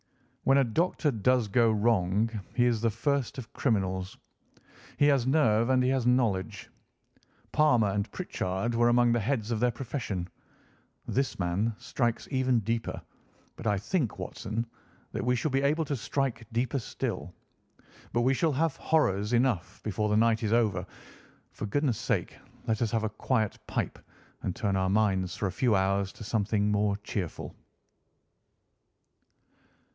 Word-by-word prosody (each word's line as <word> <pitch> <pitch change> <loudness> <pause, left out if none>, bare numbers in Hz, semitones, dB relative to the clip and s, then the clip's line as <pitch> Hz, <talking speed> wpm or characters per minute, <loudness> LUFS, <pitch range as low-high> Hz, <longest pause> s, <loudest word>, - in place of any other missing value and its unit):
When 135 +1 +5
a 140 - +5
doctor 150 +5 +1
does 120 +1 +2
go 115 +2 +3
wrong 105 -1 +2 0.3
he 120 - +4
is 115 -3 +1
the 115 - +3
first 140 +4 -1
of 120 -4 -8
criminals. 95 -6 -1 0.8
He 145 - +4
has 140 -4 +3
nerve 115 -5 +3
and 130 -1 +4
he 125 - +2
has 130 -2 +1
knowledge. 115 -8 0 0.8
Palmer 135 -9 +4
and 100 0 -2
Pritchard 95 +6 -2
were 120 +1 +3
among 120 0 +4
the 120 - +2
heads 115 0 -1
of 115 - 0
their 125 +2 +3
profession. 115 -9 -4 0.8
This 135 +1 -1
man 95 +5 0
strikes 120 -3 -2
even 130 -3 +2
deeper, 115 +2 -2 0.6
but - - -6
I 105 -1 +2
think, 125 - -1
Watson, 115 +1 -4 0.5
that - - -3
we 125 +1 +2
shall 140 +5 -1
be 135 +1 +2
able 150 +3 +1
to 145 - -2
strike 130 -2 -2
deeper 125 +4 0
still. 115 - -4 0.8
But 120 - +1
we 130 +3 +3
shall 160 +4 +1
have 155 +1 +1
horrors 105 -9 +1
enough 120 -7 0
before 105 0 -1
the 105 - +3
night 115 0 +3
is 110 -2 -1
over; 110 -6 +2 0.7
for 110 - -5
goodness' 130 +1 0
sake - - -1 0.3
let 110 0 0
us 115 - +2
have 115 -1 0
a 110 - 0
quiet 110 -2 -1
pipe - - -2 0.4
and 90 - -3
turn 100 -3 0
our 95 0 +1
minds 95 -3 +1
for 105 - -2
a 95 - 0
few 115 +3 +2
hours 95 0 +1
to - - -10
something 105 -1 0
more 105 -1 +1
cheerful." 100 -4 -5
115 Hz, 160 wpm, -29 LUFS, 105-130 Hz, 0.8 s, When